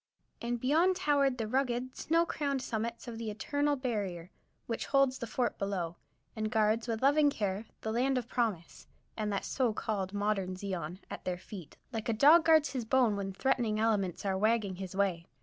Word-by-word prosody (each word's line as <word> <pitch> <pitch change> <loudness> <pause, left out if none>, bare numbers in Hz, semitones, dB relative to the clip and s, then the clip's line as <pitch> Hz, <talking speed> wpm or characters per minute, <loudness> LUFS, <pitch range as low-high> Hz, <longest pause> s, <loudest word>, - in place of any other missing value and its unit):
And 240 0 -2
beyond 320 +9 +3
towered 280 -5 +2
the 225 -2 -2
rugged, 255 +1 -1
snow 335 +2 +2
crowned 280 -5 -2
summits 230 +2 -3
of 230 -1 -6
the 225 -2 -3
"eternal 285 +7 0
barrier" 200 -9 -3 0.3
which 230 - -3
holds 275 -2 +3
the 235 - -4
fort 245 +3 -1
below, 180 -4 -2 0.4
and 215 -1 -2
guards 220 +1 +2
with 225 +1 -2
loving 290 +2 +5
care 205 -4 -2 0.2
the 220 - -2
"Land 255 +3 +1
of 245 - -3
Promise" 215 -9 -2 0.3
and 215 -1 -2
that 200 - -2
so 250 -5 0
called 205 -4 -2
"modern 205 -2 -1
Zion" 185 -3 -4
at - - -6
their 180 -1 -2
feet, 180 -2 -10 0.2
like 225 +1 -3
a - - +2
dog 300 +9 +6
guards 315 -2 +5
his 255 -3 -2
bone 235 -2 +3
when 195 -1 -3
threatening 230 0 0
elements 205 -5 0
are 190 -1 0
wagging 215 -3 +1
his 190 -1 -6
way. 185 -4 0
225 Hz, 185 wpm, -31 LUFS, 200-260 Hz, 0.4 s, dog